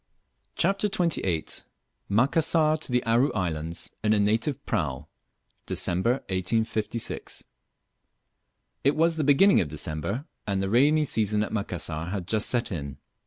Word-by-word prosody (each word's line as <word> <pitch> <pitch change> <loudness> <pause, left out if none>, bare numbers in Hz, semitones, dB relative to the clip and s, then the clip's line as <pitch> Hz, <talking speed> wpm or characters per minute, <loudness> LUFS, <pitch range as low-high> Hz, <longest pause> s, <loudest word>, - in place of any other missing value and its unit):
CHAPTER 195 +3 +1
XXVIII. 170 - 0 0.6
MACASSAR 155 +7 +3
TO 155 - -5
THE 125 0 +2
ARU 120 +5 +2
ISLANDS 85 -3 -2
IN 110 0 +3
A 105 - +2
NATIVE 115 +7 0
PRAU. 70 -2 -2 0.6
(DECEMBER, 95 +7 +1 0.2
1856.) 110 +4 -2 1.4
IT 140 - +3
was 165 +1 +2
the 155 - 0
beginning 170 +8 +5
of 85 - -2
December, 80 - -3 0.2
and 100 -1 0
the 95 0 -2
rainy 150 +6 +4
season 105 -4 +1
at - - -5
Macassar 85 -6 -3
had 90 -1 -4
just 110 +1 0
set 120 -3 0
in. 70 -6 -5
110 Hz, 130 wpm, -26 LUFS, 90-145 Hz, 1.4 s, beginning